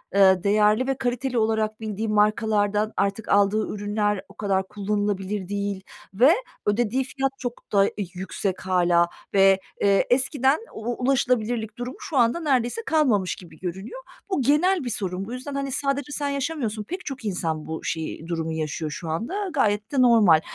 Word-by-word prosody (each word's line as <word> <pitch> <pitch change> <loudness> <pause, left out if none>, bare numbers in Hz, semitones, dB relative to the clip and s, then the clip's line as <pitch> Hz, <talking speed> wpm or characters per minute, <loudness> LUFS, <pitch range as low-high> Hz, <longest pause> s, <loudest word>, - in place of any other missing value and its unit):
ııı, 190 -2 +5
değerli 210 +4 +3
ve 270 - 0
kaliteli 250 0 -1
olarak 220 0 0
bildiğin 215 0 -3
markalardan 210 0 +2
artık 200 +2 -1
aldığı 205 +2 +3
ürünler 205 -1 -1
o - - -14
kadar 195 -2 -1
kullanılabilir 205 -1 -2
değil 200 0 -2 0.4
ve 250 +10 +6 0.3
ödediği 240 +5 +1
fiyat 270 +1 -2
çok 245 -1 -6
da 200 -1 +4 0.2
yüksek 190 +1 -3
hâlâ 175 -2 +3 0.2
ve, 195 -1 +5 0.2
eee, 200 -1 +4
eskiden 265 +2 +2
u 240 +3 -4
ulaşılabilirlik 245 -4 0
durumu 245 +2 -5
şu 290 - -4
anda 235 +6 +3
neredeyse 270 - 0
kalmamış 245 - +2
gibi 165 -4 -14
görünüyor. 190 - -6 0.3
Bu 375 - 0
genel 305 +7 +3
bir 245 - -3
sorun. 190 -3 -3
Bu 230 - -7
yüzden, 260 +3 -6
hani, 275 0 -2
sadece 275 +1 -1
sen 285 0 -2
yaşamıyorsun, 270 -7 -2
pek 365 - -6
çok 265 -5 -6
insan 165 -6 -2
bu 160 0 -5
şeyi, 160 0 -4
durumu 165 -1 -2
yaşıyor 155 0 -3
şu 160 +2 -6
anda. 220 - -3 0.2
Gayet 210 -6 +1
de 275 -3 +2
normal. 215 -10 +6
215 Hz, 160 wpm, -24 LUFS, 195-255 Hz, 0.4 s, ve